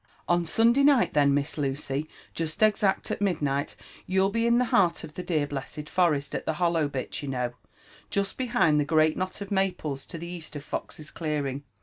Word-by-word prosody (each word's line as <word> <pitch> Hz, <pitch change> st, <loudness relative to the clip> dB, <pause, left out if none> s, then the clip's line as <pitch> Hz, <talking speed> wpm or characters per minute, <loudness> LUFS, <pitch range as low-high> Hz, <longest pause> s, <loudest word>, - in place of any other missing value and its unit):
*' -, -, -33 dB
On 175 Hz, -1 st, +2 dB
Sunday 235 Hz, +9 st, +4 dB
night 280 Hz, -3 st, +4 dB
then, 145 Hz, -1 st, +4 dB
Miss 145 Hz, +2 st, -1 dB
Lucy, 140 Hz, +1 st, -2 dB, 0.2 s
jest 160 Hz, +4 st, -2 dB
exact 205 Hz, -2 st, +2 dB
at -, -, -3 dB
midnight, 145 Hz, -8 st, 0 dB, 0.3 s
you'll 190 Hz, +1 st, +2 dB
be 230 Hz, +1 st, +1 dB
in 235 Hz, 0 st, +4 dB
the 250 Hz, -, +3 dB
heart 175 Hz, -3 st, +3 dB
of 155 Hz, -2 st, -9 dB
the 180 Hz, -, -5 dB
dear 160 Hz, -5 st, 0 dB
blessed 145 Hz, +2 st, -6 dB
forest, 150 Hz, -6 st, +1 dB
at -, -, -4 dB
the 160 Hz, -, +1 dB
hollow 170 Hz, -2 st, +1 dB
bit, 135 Hz, -2 st, -4 dB
you 145 Hz, -, -6 dB
know» 125 Hz, -2 st, -2 dB, 0.6 s
jest 200 Hz, -1 st, -1 dB
behind 235 Hz, -12 st, +2 dB
the -, -, +3 dB
great 155 Hz, +1 st, +3 dB
knot 185 Hz, +2 st, -4 dB
of 200 Hz, -, -6 dB
maples 185 Hz, -8 st, -1 dB
to 170 Hz, -, -7 dB
the 170 Hz, -, -7 dB
east 170 Hz, -3 st, -7 dB
of 145 Hz, -, -6 dB
Fox's 150 Hz, +1 st, -6 dB
clearing. 145 Hz, -4 st, -2 dB
160 Hz, 205 wpm, -27 LUFS, 145-190 Hz, 0.6 s, Sunday